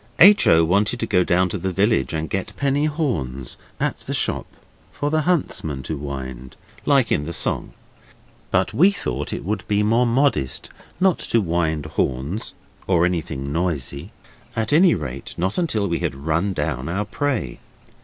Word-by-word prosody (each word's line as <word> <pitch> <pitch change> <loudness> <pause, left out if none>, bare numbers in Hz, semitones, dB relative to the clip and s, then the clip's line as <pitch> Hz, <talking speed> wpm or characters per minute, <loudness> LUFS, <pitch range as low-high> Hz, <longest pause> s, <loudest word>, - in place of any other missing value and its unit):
H. 200 +4 +7
O. 80 0 +6
wanted 100 +7 +1
to - - +1
go 90 - +3
down 90 +1 +2
to 100 - -3
the 95 +2 -2
village 105 +5 +2
and 80 -1 -2
get 95 +4 -4
penny 140 +1 +1
horns 75 - -2 0.2
at - - -1
the - - -4
shop - - -1 0.4
for 145 0 -2
the 155 0 +2
huntsmen 80 - -1
to 80 - -3
wind, 65 -3 -7 0.3
like 135 -5 +4
in 75 - +1
the 85 - -5
song, - - -1 0.8
but 95 +2 +1
we 165 - +6
thought 75 - -3
it - - -5
would 105 +1 -2
be 105 0 +2
more 115 +3 +3
modest 115 - +1 0.3
not 185 -2 +3
to 115 - +1
wind 80 -5 0
horns 75 - -2 0.3
or 85 -2 +4
anything 80 -6 -2
noisy, 80 - -2 0.4
at 110 +3 0
any 170 +3 +6
rate 70 -4 -6
not 95 - 0
until 120 - 0
we 85 -2 -1
had - - -2
run 85 +5 +1
down 75 -5 -2
our 100 +5 -1
prey. 115 - -2
90 Hz, 170 wpm, -22 LUFS, 75-115 Hz, 0.8 s, H